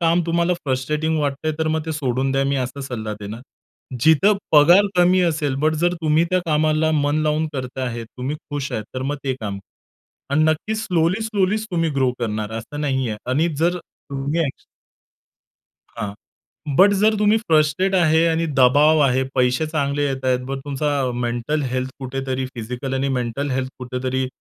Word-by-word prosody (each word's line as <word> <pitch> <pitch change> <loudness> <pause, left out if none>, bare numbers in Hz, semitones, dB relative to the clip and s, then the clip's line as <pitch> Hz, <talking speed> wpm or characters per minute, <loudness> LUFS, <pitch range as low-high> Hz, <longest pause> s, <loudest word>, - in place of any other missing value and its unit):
काम 170 +1 +3
तुम्हाला 170 +1 +1
फ्रस्ट्रेटिंग 150 +4 -1
वाटतंय 145 +2 -1
तर 160 0 0
मग 160 0 -1
ते 160 - -2
सोडून 135 -2 -1
द्या, 135 0 +1
मी 140 0 0
असा 130 +2 -3
सल्ला 110 -5 -4
देणार. 105 +3 -7 0.6
जिथं 160 - +5 0.2
पगार 175 +7 +7
कमी 180 +1 +5
असेल, 155 -5 0
बट 155 0 +3
जर 175 0 +2
तुम्ही 155 +2 +3
त्या 185 - +3
कामाला 155 0 +2
मन 145 -1 +1
लावून 155 +1 +1
करत 130 -1 -5
आहेत, 120 -3 -3
तुम्ही 135 +4 -3
खुश 145 -1 -3
आहे 110 - -2
तर 130 - -3
मग 145 +2 -2
ते 130 -1 0
काम 100 -2 -4
करा - - -22 0.6
अन् 155 +1 +4
नक्कीच 215 +8 -1
स्लोली, 180 +4 +1
स्लोली 210 -2 +1
तुम्ही 165 -2 0
ग्रो 130 -2 +2
करणार 110 -2 -3
असं 145 +6 -7
नाहीये 130 -6 -1
आणि 155 +6 +2
जर 175 +2 +2
तुम्ही 140 +1 -5
अक 135 - -6 1.3
हां. 105 -4 -5 0.6
बट 200 +4 +6
जर 215 +1 +4
तुम्ही 210 +1 +4
फ्रस्ट्रेट 165 0 +2
आहे 165 -2 +4
आणि 165 0 +1
दबाव 145 +5 +5
आहे, 130 +1 +2
पैसे 130 +4 +2
चांगले 145 -2 -1
येतायत 130 -2 0
मग 135 0 -3
तुमचा 140 -2 -1
मेंटल 120 +6 -1
हेल्थ 130 0 -2
कुठेतरी 130 0 -3
फिजिकल 125 +3 -4
आणि 135 +1 0
मेंटल 125 +4 -3
हेल्थ 130 0 -1
कुठेतरी 130 +1 -2
145 Hz, 170 wpm, -21 LUFS, 130-160 Hz, 1.3 s, पगार